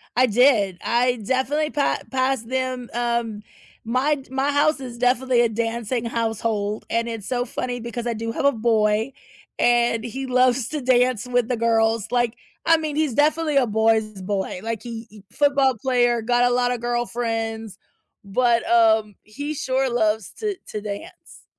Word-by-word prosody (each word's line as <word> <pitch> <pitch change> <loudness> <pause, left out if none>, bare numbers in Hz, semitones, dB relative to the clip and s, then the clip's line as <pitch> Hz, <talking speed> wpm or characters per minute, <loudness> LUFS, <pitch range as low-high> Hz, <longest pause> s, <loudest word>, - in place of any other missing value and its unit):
I 255 - +5
did, 220 -5 +3
I 245 +1 +2
definitely 265 +5 0
pa 290 -2 0
pass 260 -2 0
them 255 0 -3
um, 235 -3 -1 0.4
my 255 +6 +1
j 270 -3 -13
my 270 +2 0
house 295 +1 +2
is 245 -3 -8
definitely 250 0 +2
a 235 - +3
dancing 230 +1 -2
household, 225 -2 -2
and 230 0 0
it's 225 -4 -6
so 245 -1 -1
funny 245 0 -4
because 235 0 -5
I 240 - -1
do 230 +1 -4
have 280 - -2
a 280 - +6
boy, 220 0 +1 0.4
and 240 -1 +2
he 260 +3 -5
loves 255 -1 +2
to 305 -2 -4
dance 250 -2 +2
with 245 -2 +1
the 250 - 0
girls, 225 -1 +1
like, 240 -1 +1 0.3
I 330 0 +5
mean, 310 -2 -4
he's 305 -4 0
definitely 305 +2 +2
a 265 - +4
boy's 220 -1 +1
boy, 190 -1 -3
like, 225 -1 -4
he 230 -1 -7
he 210 -1 -15
football 275 -3 +2
player, 240 -2 +2
got 245 +2 +2
a - - 0
lotta 245 0 +1
girlfriends, 225 -3 -3 0.5
but, 235 +3 +1
um, 220 -3 +3
he 285 +8 -5
sure 265 -2 0
loves 220 -3 0
to 425 -2 -2
to 210 - -5
dance. 205 -1 -9
240 Hz, 165 wpm, -22 LUFS, 225-260 Hz, 0.5 s, a